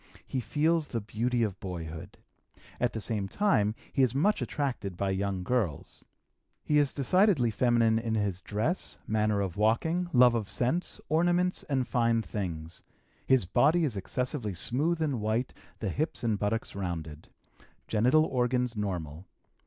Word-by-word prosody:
He 130 - -3
feels 150 +7 +1
the 115 - -2
beauty 115 +3 -1
of 100 -4 -2
boyhood. 85 0 -7 0.6
At 125 - +1
the 110 - -4
same 105 -2 -2
time 110 - +2 0.2
he 135 - +2
is 130 -1 +2
much 200 +10 +2
attracted 120 - -3
by 100 0 0
young 95 -1 -1
girls. 100 - -2 0.6
He 150 -1 +3
is 145 -2 +2
decidedly 145 - +3
feminine 115 -1 +3
in 115 -1 -2
his 100 -4 -1
dress, 110 - -2
manner 105 -1 +1
of 95 -2 -3
walking, 160 +12 +1
love 125 -1 +6
of 110 -4 -2
scents, 145 +9 -1
ornaments, 175 +3 +2
and 130 -3 0
fine 115 -2 +2
things. 85 -6 -5 0.5
His 130 -7 +4
body 155 - +3
is 130 -7 -2
excessively 110 +1 -3
smooth 155 - 0
and 135 -7 -1
white, 110 +4 -1 0.2
the 105 - -3
hips 150 - -2
and 110 -3 +1
buttocks 110 +2 -1
rounded. 80 -5 -5 0.6
Genital 125 +9 +4
organs 125 -2 0
normal. 90 -5 -4
115 Hz, 150 wpm, -29 LUFS, 100-135 Hz, 0.6 s, love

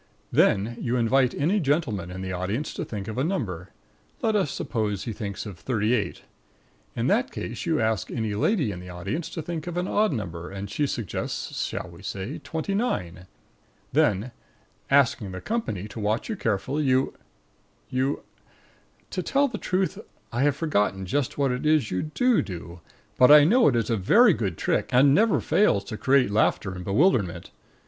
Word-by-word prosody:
Then 110 +5 +2
you 120 +1 -1
invite 125 +2 +2
any 175 +9 +1
gentleman 135 - 0
in 95 +1 -6
the 95 - -4
audience 100 +11 -3
to - - -4
think 100 -3 -6
of 110 +3 -4
a - - +1
number. 105 - -3 0.5
Let 220 -1 +2
us 195 -8 +2
suppose 105 -4 -2
he 115 - -4
thinks 100 -1 -5
of 100 -5 -8
38. 110 -2 -1 0.7
In - - -1
that - - +2
case - - -6
you - - +2
ask 110 -2 0
any 110 -3 -2
lady 140 - +1
in 90 - -6
the 90 0 -10
audience 95 - -4
to 160 - -5
think 165 -1 -5
of 175 0 -4
an 180 +1 -1
odd 215 -1 +2
number, 90 - -5
and 100 0 -6
she 145 - 0
suggests 115 -8 -3
(shall - - -5
we 85 +1 -13
say?) 100 +7 -5
29. 160 - -2 0.7
Then, 105 +5 +2 0.6
asking 125 -8 +3
the 90 - -5
company 110 - -3
to 110 - -8
watch 110 - -1
you 220 - -1
carefully, 115 - -1
you 130 0 +2 0.8
you 130 +2 0 0.9
To - - -2
tell 280 +1 +2
the 215 -4 -5
truth, 190 +1 -1 0.3
I 120 - 0
have 145 0 +3
forgotten 105 - 0
just 130 +8 -1
what 140 -2 +2
it 125 - -3
is 150 -6 +2
you 90 - 0
do 240 +10 +2
do, 85 -2 -8 0.4
but 125 - +7
I 150 0 +9
know 225 - +5
that 120 - +1
it 115 - +2
is 110 - -9
a 115 - +2
very 205 - +5
good 95 - -2
trick, - - 0
and 135 +2 +5
never 220 +5 +4
fails 200 - +2
to - - -6
create 130 -1 +3
laughter 100 -2 +1
and 90 -1 -7
bewilderment. 100 - +1
120 Hz, 185 wpm, -25 LUFS, 100-155 Hz, 0.9 s, I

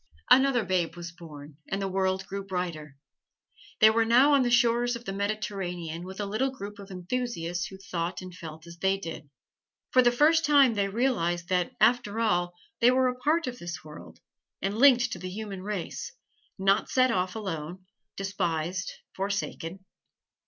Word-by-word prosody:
Another 260 -4 +5
babe 180 -2 0
was 170 -1 -7
born 150 -4 -12
and 195 - -1
the 195 - -1
world 190 0 0
grew 200 0 -5
brighter. 170 -7 -4 0.8
They 215 0 +8
were 225 +1 +3
now 250 +6 +5
on 280 - +5
the 245 - +1
shores 240 0 +3
of 235 +1 -9
the 195 - -4
Mediterranean 195 -5 -3
with 190 +2 -9
a 205 - -1
little 215 +7 0
group 205 -5 -8
of 200 0 -10
enthusiasts 180 -2 -3
who 190 - -10
thought 175 -2 -4
and 185 -1 -9
felt 160 -2 -10
as 170 0 -12
they 190 +1 +2
did. 165 -6 -8 0.6
For 255 - +6
the 240 -1 +4
first 310 +6 +4
time 280 -5 +5
they 200 -2 0
realized 195 -7 0
that, 185 +7 0
after 225 -1 +3
all, 175 -6 +1 0.2
they 235 - +6
were 255 0 +3
a 250 - -5
part 310 +5 +1
of 245 -1 -5
the 175 0 -6
world, 150 -1 -12 0.4
and 195 +2 -2
linked 245 -1 +5
to - - -5
the 185 - -5
human 200 -1 -6
race 210 - -4 0.5
not 195 +2 +2
set 255 -1 +3
off 185 -2 -1
alone, 185 -3 -5 0.3
despised, 180 -3 -2 0.2
forsaken. 190 -2 -4
195 Hz, 175 wpm, -28 LUFS, 175-240 Hz, 0.8 s, They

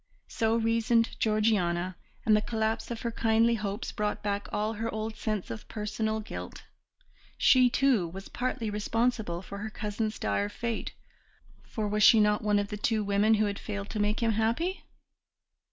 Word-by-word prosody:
So 225 0 +1
reasoned 230 +1 +2
Georgiana, 185 -5 +1 0.3
and 215 - +5
the 210 - +3
collapse 220 0 -1
of 235 -2 -5
her 235 - -2
kindly 225 +1 +3
hopes 210 -1 -3
brought 210 -1 -2
back 200 0 -2
all 215 +1 -1
her 225 +1 -3
old 220 0 -4
sense 215 - -3
of 115 - -7
personal 220 0 -2
guilt; 215 - -8 0.7
she, 255 -2 +5
too, 245 -8 +2
was 190 +4 -9
partly 245 -3 -3
responsible 210 -3 -1
for 200 +1 -8
her 220 +1 -4
cousin's 215 0 -3
dire 100 0 0
fate, 235 - -4 0.7
for 215 -2 -3
was 210 +1 0
she 220 +1 +8
not 210 0 +3
one 210 -1 +2
of 205 0 -1
the 210 - -4
two 215 0 0
women 205 +2 +3
who 215 0 +2
had 200 -1 -3
failed 200 -1 -5
to 215 - -3
make 210 +2 0
him 230 -1 +2
happy? 230 - 0
215 Hz, 170 wpm, -29 LUFS, 205-225 Hz, 0.7 s, she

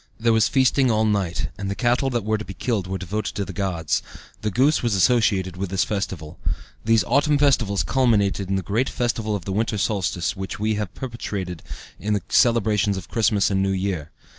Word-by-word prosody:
There 115 0 +3
was 110 -1 +4
feasting 130 0 +3
all 110 -1 +2
night, 100 -5 0
and 100 -1 -3
the 100 - -2
cattle 120 +5 +1
that 120 -4 -1
were 110 0 0
to - - -5
be 95 - -9
killed 100 -1 -1
were 95 +1 -3
devoted 95 +3 -4
to 100 - -2
the - - -7
gods; 90 -6 -1 0.4
the 105 - 0
goose 135 +9 +3
was 115 -4 +1
associated 95 -4 +2
with 95 0 -3
this 95 0 +1
festival. 95 -7 -4 0.4
These 115 -2 +3
autumn 145 - +2
festivals 120 -9 +2
culminated 100 -7 +1
in 95 - +1
the 95 - -1
great 110 +8 0
festival 115 -4 -1
of 95 -4 -5
the 95 - -3
winter 110 +1 0
solstice 95 -4 -1
which 95 +1 -5
we 110 +1 +1
have 105 -3 -3
perpetuated 100 - -5 0.4
in 105 +1 -1
the 100 -4 -1
celebrations 105 -3 +3
of 95 - -8
Christmas 110 -3 +2
and 95 0 +1
New 95 - +1
Year. 95 -5 -2
105 Hz, 205 wpm, -23 LUFS, 95-115 Hz, 0.4 s, was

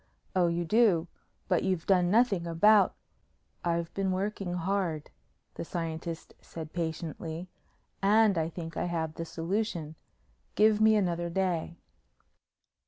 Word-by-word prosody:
"Oh, 180 -2 +4
you 170 0 -1
do? 190 -4 +3 0.4
But 180 -3 +2
you've 185 -3 -1
done 180 -2 +3
nothing 205 -5 +3
about 200 +4 +4 0.4
" - - -40 0.3
"I've 170 -1 -1
been 195 -1 0
working 195 -1 -2
hard," 180 -4 -2 0.4
the - - -5
scientist 165 -1 -5
said 160 -2 -9
patiently, 165 +1 -4 0.5
"and 210 +1 +4
I 160 -1 0
think 165 -1 -7
I - - 0
have 165 -3 -2
the 165 - -5
solution. 170 0 -3 0.6
Give 215 0 +4
me 220 0 +6
another 175 -4 0
day." 170 -2 -1
175 Hz, 130 wpm, -29 LUFS, 165-195 Hz, 0.6 s, me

